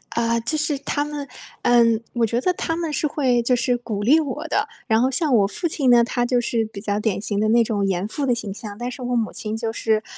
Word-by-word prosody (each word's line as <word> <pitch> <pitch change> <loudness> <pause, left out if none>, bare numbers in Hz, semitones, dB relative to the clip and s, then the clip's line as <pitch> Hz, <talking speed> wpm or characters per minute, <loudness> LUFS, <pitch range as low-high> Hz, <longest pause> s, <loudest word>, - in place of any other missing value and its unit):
呃， 230 0 +1
就 310 +7 -1
是 295 -1 0
他 290 +1 -1
们， 295 -1 -5 0.4
嗯， 230 -2 +4
我 235 -1 +2
觉 230 +2 0
得 365 - +2
他 325 -2 -2
们 330 -2 -3
是 300 +1 0
会 255 -5 +1
就 250 +2 +2
是 245 0 +1
鼓 215 -4 -4
励 290 +8 +5
我 300 +1 -4
的， 425 +2 +1 0.2
然 220 +1 +3
后 260 - +3
像 295 0 0
我 205 -4 +4
父 345 - -3
亲 280 -5 +1
呢， 240 -1 +7
他 245 +1 -1
就 245 0 +1
是 230 -1 0
比 205 -2 -9
较 205 -1 -1
典 210 -2 -1
型 205 -1 -2
的 215 - +2
那 235 +1 +5
种 205 -3 -1
严 185 0 -1
父 280 +6 -3
的 245 -3 +2
形 205 -4 -5
象， 205 -1 -8
但 245 +1 -4
是 255 - -9
我 245 0 -1
母 225 -2 0
亲 215 0 -4
就 225 0 -2
是， 220 -1 0
240 Hz, 285 characters per minute, -22 LUFS, 220-280 Hz, 0.4 s, 呢